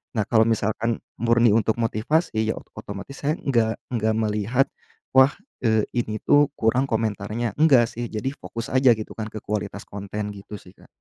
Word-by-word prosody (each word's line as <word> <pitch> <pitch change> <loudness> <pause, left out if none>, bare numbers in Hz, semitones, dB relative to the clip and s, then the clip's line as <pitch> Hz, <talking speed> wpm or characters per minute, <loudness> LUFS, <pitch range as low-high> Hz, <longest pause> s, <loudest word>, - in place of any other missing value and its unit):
Nah, 110 - +1
kalau 110 -2 +4
misalkan 115 +1 0 0.2
murni 115 0 +4
untuk 110 0 +2
motivasi, 115 +3 0
ya 110 - +1
oto - - -19
otomatis 100 +7 -8
saya 150 +3 +1
nggak 115 -5 +1 0.2
nggak 110 -2 +1
melihat, 110 +4 +1 0.5
wah, 130 +2 +7 0.3
eee, 110 -2 +3
ini 110 -3 -1
tuh 145 0 +5
kurang 125 +4 +2
komentarnya. 110 0 -2
Nggak 135 -7 +6
sih, 120 +1 -3
jadi 110 +4 -2
fokus 115 +2 -6
aja 130 -1 +6
gitu 110 - -7
kan, 110 -1 -3
ke 110 - -6
kualitas 105 -1 -4
konten 100 +1 -5
gitu 100 +1 -9
sih, 90 - -17
Kak. - - -19
110 Hz, 175 wpm, -24 LUFS, 105-120 Hz, 0.5 s, wah